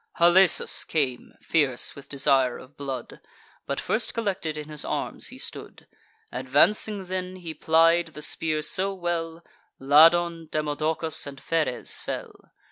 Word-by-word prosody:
Halesus 175 +2 +5
came, 135 -6 -2
fierce 140 -7 0
with 140 - -13
desire 135 -3 +1
of 130 +2 -15
blood; 135 -3 -6 0.5
But 140 - -2
first 220 +2 -2
collected 190 -8 -2
in 150 -1 -7
his 150 -1 -3
arms - - -3
he - - -8
stood: - - -7 0.5
Advancing 180 +10 +1
then, 185 0 -5
he 170 -3 -8
plied 165 +2 +3
the 150 -2 -6
spear 155 -1 -1
so 195 +5 0
well, 170 -2 -4 0.3
Ladon, 165 +4 +4
Demodocus, 155 +1 -2
and 140 -1 -9
Pheres 155 -6 -1
fell. - - -6
160 Hz, 130 wpm, -25 LUFS, 145-175 Hz, 0.5 s, Halesus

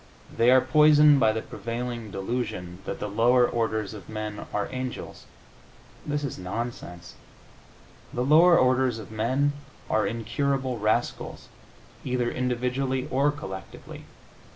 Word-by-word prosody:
They 115 +1 +4
are 130 0 +7
poisoned 150 +2 +6
by 110 - +4
the 110 0 -3
prevailing 120 -1 -5
delusion 95 -4 -4
that - - -5
the 105 - -3
lower 120 +4 +3
orders 110 -3 -2
of 100 -5 -11
men 110 -1 -5
are 105 -1 -1
angels. 130 -1 -6 0.8
This 145 0 -1
is 140 - -4
nonsense. 90 -3 -6 1.0
The 125 - -2
lower 170 +5 +6
orders 130 -2 +2
of 110 -1 -10
men 130 +7 0 0.4
are 110 -2 +2
incurable 125 +3 -2
rascals, 105 +1 -2 0.5
either 125 -2 -1
individually 125 +1 -1
or 140 +3 +3
collectively. 95 -11 -8
120 Hz, 125 wpm, -26 LUFS, 110-130 Hz, 1.0 s, are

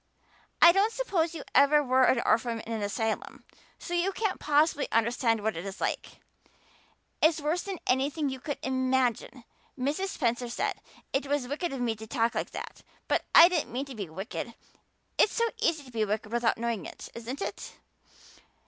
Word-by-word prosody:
I 340 - +11
don't 395 +5 +2
suppose 375 -9 -1
you 300 - -6
ever 295 +1 +5
were 260 -1 +4
an 240 - +3
orphan 230 +1 +1
in 230 - -6
an 220 - -3
asylum, 220 +2 -3 0.3
so 350 - -7
you 350 +3 +1
can't 420 -1 -2
possibly 300 0 +2
understand 230 -1 +1
what 220 0 0
it 165 - -5
is 195 0 -7
like. - - -3 1.0
It's 315 0 +4
worse 310 +4 0
than 390 -2 -5
anything 280 +4 +1
you 265 -1 -4
could 290 +2 -4
imagine. 260 -1 0 0.3
Mrs. 290 +9 -1
Spencer 240 -8 -1
said 235 - -2 0.3
it 275 +1 0
was 285 -3 0
wicked 300 +5 -2
of 270 -2 -4
me 235 -2 +1
to 220 +1 -9
talk 230 -1 +1
like - - -2
that, - - -8 0.3
but - - +1
I 335 - +11
didn't 350 -4 -1
mean 260 +4 -2
to 275 - -9
be 200 -6 -5
wicked. 195 +6 -6 0.6
It's - - +5
so 465 - +2 0.2
easy 315 -3 +1
to 255 - -14
be 225 -2 0
wicked 215 +1 -2
without 235 -1 +1
knowing 230 -5 -2
it, - - -10
isn't 235 +4 -6
it? - - -5
260 Hz, 185 wpm, -28 LUFS, 230-305 Hz, 1.0 s, I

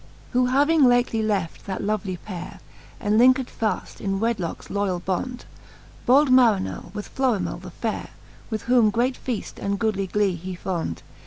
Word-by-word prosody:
Who 250 0 +3
having 290 +4 +4
lately 245 -2 +3
left 200 -6 -2
that 190 - -3
lovely 200 -3 -1
pay 180 -1 -7 0.5
re 235 - -6
Enlincked 250 +4 +4
faft 220 -1 -2
in 195 -1 -1
wedlockes 215 -7 -2
loyall 200 -3 0
bond, 245 +7 -3 0.6
Bold 270 +2 +5
Marinell 225 -9 +3
with 210 - -6
Fiorimell 215 -10 0
the 185 - -8
fayre, 220 +5 -4 0.4
With 220 -2 -3
whom 240 -3 +4
great 245 +5 +1
feaft 245 -5 -4
and 200 0 0
goodly 200 -3 0
glee 205 0 +1
he 180 +2 -6
fond. 170 - -3
215 Hz, 155 wpm, -24 LUFS, 190-245 Hz, 0.6 s, Bold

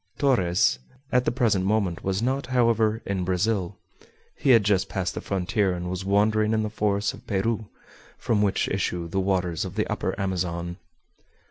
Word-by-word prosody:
Torres 90 - +2 0.3
at 125 0 +3
the - - +2
present 115 -6 +1
moment 95 -4 0
was 95 +3 -1
not, 130 +1 -1
however, 115 -3 +2
in 95 -2 -2
Brazil. 95 +1 0 0.6
He - - -1
had 115 -4 +7
just 95 -1 +1
passed 90 -2 -2
the - - -5
frontier, 95 0 0
and 90 0 -4
was 95 0 -4
wandering 105 +2 +2
in 110 0 +1
the 105 - -3
forests 105 -1 0
of - - -14
Peru, 110 +2 -1 0.5
from 105 -3 0
which 100 -2 +1
issue 90 -3 -2
the 95 +4 -2
waters 90 -3 0
of - - -6
the - - +1
Upper - - -3
Amazon. 85 -2 -2
100 Hz, 170 wpm, -25 LUFS, 90-110 Hz, 0.6 s, had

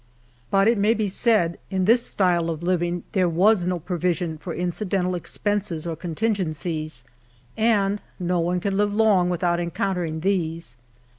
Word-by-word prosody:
But 195 +1 +3
it 230 -2 +3
may 215 +3 +3
be 215 -2 0
said 190 -4 +2
in 190 -2 0
this 235 +3 +5
style 175 -6 +1
of 165 0 -4
living 175 -1 0
there 185 -4 +2
was 180 +2 +3
no 180 -1 0
provision 175 -1 -2
for 175 - -6
incidental 180 +1 -1
expenses 190 -1 -2
or 165 -1 -3
contingencies, 165 - -3 0.5
and 205 -3 +2 0.2
no 180 -1 0
one 175 +2 0
can 195 +1 -1
live 205 0 +1
long 205 -5 +3
without 175 0 0
encountering 170 -2 -2
these. 165 -8 -2
180 Hz, 150 wpm, -23 LUFS, 170-200 Hz, 0.5 s, this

